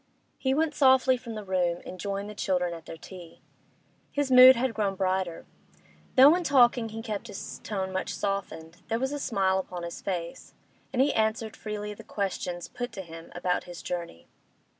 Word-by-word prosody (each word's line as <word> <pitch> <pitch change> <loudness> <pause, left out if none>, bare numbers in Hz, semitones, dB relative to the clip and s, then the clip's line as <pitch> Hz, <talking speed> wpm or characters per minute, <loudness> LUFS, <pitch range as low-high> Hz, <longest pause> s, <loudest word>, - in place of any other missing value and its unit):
He 265 0 +1
went 320 +1 +1
softly 265 -2 +5
from 240 -2 -8
the 215 - -5
room, 180 -3 0
and 185 - -8
joined 200 +1 -3
the 210 - -7
children 180 -4 0
at 165 0 -10
their 165 - -8
tea. 175 0 -12 0.7
His 285 -2 -1
mood 255 +1 +10
had 245 0 0
grown 200 -3 -1
brighter. 185 -2 -1 0.7
Though 275 +3 +9
in 355 +1 0
talking 245 -5 +4
he 225 +1 -7
kept 215 -4 -4
his - - -7
tone 190 -2 -3
much 185 -1 -2
softened, 180 -5 -4
there 225 - 0
was 265 +3 -1
a 290 - -3
smile 190 -7 +1
upon 180 -2 -6
his 170 0 -6
face, 175 -3 -5 0.4
and 260 0 +3
he 285 - +1
answered 220 0 0
freely 210 -1 -5
the - - -12
questions 180 -3 -3
put 245 0 -5
to 190 - -6
him 165 -1 -11
about 180 0 -1
his 175 -1 -9
journey. 170 - -5
200 Hz, 185 wpm, -28 LUFS, 180-245 Hz, 0.7 s, mood